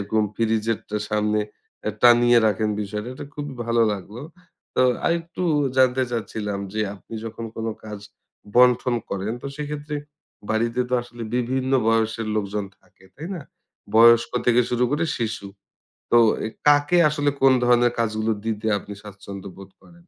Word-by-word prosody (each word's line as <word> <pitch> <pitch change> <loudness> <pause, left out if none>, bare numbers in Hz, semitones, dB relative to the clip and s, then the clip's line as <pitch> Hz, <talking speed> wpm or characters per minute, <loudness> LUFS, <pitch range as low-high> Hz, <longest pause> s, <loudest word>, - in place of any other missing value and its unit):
যেরকম 110 +2 0
ফ্রিজের 115 -1 0
টা 105 - -1
সামনে 105 0 +1 0.5
এ - - +1
টানিয়ে 120 0 +6
রাখেন 105 +1 +1
বিষয়টা 105 +3 -5
এটা - - -8
খুবই 145 -1 -5
ভালো 115 0 +3
লাগলো। 105 +5 -7 0.5
তো, 130 - +5 0.2
আরেকটু 170 +1 -1 0.3
জানতে 130 0 +4
চাচ্ছিলাম 105 -3 -3
যে, 110 - -2
আপনি 105 - -12
যখন 115 +1 -6
কোন 115 0 -3 0.2
কাজ 105 -1 -7 0.6
বন্টন 125 0 +5 0.2
করেন, 100 +3 -2
তো - - -5
সেক্ষেত্রে 150 0 -5 0.5
বাড়িতে 115 +3 0
তো - - +2
আসলে 120 -1 -10
বিভিন্ন 130 +2 -1 0.2
বয়সের 115 0 +1
লোকজন 105 0 -2 0.2
থাকে, 95 - -26
তাই 160 +4 -7
না? 165 - -6 0.5
বয়স্ক 115 +1 +7 0.2
থেকে 120 0 +5
শুরু 125 0 +2
করে 155 +3 +1
শিশু। 110 -3 -3 0.6
তো 120 - +6 0.3
এ - - -2 0.2
কাকে 145 +4 +4
আসলে 145 -1 0
কোন 135 -1 +6
ধরনের 120 0 +4
কাজগুলো 110 -1 0
দিতে 110 -1 -3
আপনি 100 - -10
স্বাচ্ছন্দ্য 100 -1 -9
বোধ 95 0 -12
করেন? 170 - -19
115 Hz, 150 wpm, -23 LUFS, 105-125 Hz, 0.6 s, বয়স্ক